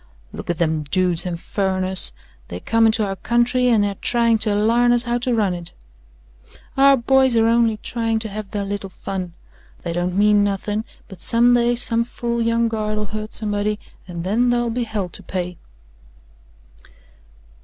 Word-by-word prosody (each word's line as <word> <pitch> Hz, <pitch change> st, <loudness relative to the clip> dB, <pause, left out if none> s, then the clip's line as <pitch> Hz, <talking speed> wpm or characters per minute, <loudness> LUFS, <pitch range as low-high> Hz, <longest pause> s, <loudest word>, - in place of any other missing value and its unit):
"Look -, -, -8 dB
at 175 Hz, -, -1 dB
them 160 Hz, -2 st, 0 dB
dudes 180 Hz, +3 st, 0 dB
and 170 Hz, -2 st, -4 dB
furriners. 190 Hz, -1 st, +1 dB, 0.4 s
They 85 Hz, -, -7 dB
come 225 Hz, -, +2 dB
into 220 Hz, -1 st, +1 dB
our 195 Hz, -1 st, -3 dB
country 240 Hz, +3 st, +1 dB
and 220 Hz, -4 st, +3 dB
air 200 Hz, -, -2 dB
tryin' 230 Hz, -2 st, +2 dB
to 210 Hz, -2 st, +3 dB
larn 230 Hz, +3 st, +3 dB
us 240 Hz, 0 st, +2 dB
how 240 Hz, 0 st, -1 dB
to 245 Hz, 0 st, 0 dB
run 205 Hz, -5 st, +1 dB
it." 175 Hz, -1 st, -7 dB, 1.0 s
"Our 275 Hz, 0 st, +5 dB
boys 260 Hz, +1 st, +3 dB
air 225 Hz, 0 st, +3 dB
only 230 Hz, -1 st, +2 dB
tryin' 225 Hz, 0 st, -2 dB
to 220 Hz, -, -2 dB
have 210 Hz, 0 st, -7 dB
their 205 Hz, -1 st, -3 dB
little 200 Hz, -1 st, -5 dB
fun. 185 Hz, -1 st, -6 dB, 0.5 s
They 170 Hz, -, -3 dB
don't 175 Hz, +2 st, -2 dB
mean 205 Hz, 0 st, +4 dB
nothin', 205 Hz, +2 st, -2 dB, 0.2 s
but 190 Hz, -, -12 dB
someday 240 Hz, +1 st, +3 dB
some 235 Hz, -1 st, +2 dB
fool 235 Hz, 0 st, -3 dB
young 230 Hz, 0 st, +1 dB
guard'll 215 Hz, -1 st, -2 dB
hurt 215 Hz, 0 st, -5 dB
somebody 210 Hz, -1 st, -2 dB, 0.3 s
and 170 Hz, -2 st, -6 dB
then 225 Hz, +7 st, +1 dB
thar'll 240 Hz, -1 st, 0 dB
be 240 Hz, +1 st, -2 dB
hell 210 Hz, -4 st, -3 dB
to 195 Hz, -, -8 dB
pay." 180 Hz, -1 st, -5 dB
215 Hz, 170 wpm, -20 LUFS, 190-235 Hz, 1.0 s, Our